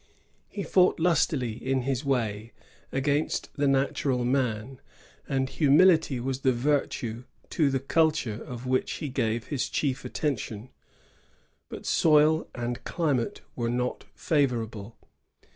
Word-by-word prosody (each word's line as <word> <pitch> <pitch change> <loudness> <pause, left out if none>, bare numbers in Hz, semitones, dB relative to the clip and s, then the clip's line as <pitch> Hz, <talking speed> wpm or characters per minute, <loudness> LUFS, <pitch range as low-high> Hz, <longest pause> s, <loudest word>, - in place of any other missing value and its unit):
He 200 - -5
fought 185 -2 +3
lustily, 155 -7 +2
in 130 +3 -2
his 135 0 -1
way, 115 -5 -1 0.4
against 140 +3 -1
the 145 -1 +1
natural 135 -2 +1
man; 125 0 -1 0.5
and 135 -1 0
humility 155 -1 +4
was 130 +1 -3
the 130 -1 +3
virtue 120 -3 -1 0.3
to 150 -4 +2
the 135 -1 0
culture 140 -6 +1
of 125 0 -8
which 130 0 0
he 150 - -4
gave 115 -3 -1
his 140 -4 -1
chief 135 -3 -1
attention; 125 -5 -3 1.0
but - - -8
soil 155 0 +4
and 120 0 -4
climate 145 -9 -1
were 120 -1 -1
not 125 +1 -2
&vorable. 115 -8 -1
130 Hz, 125 wpm, -27 LUFS, 120-145 Hz, 1.0 s, humility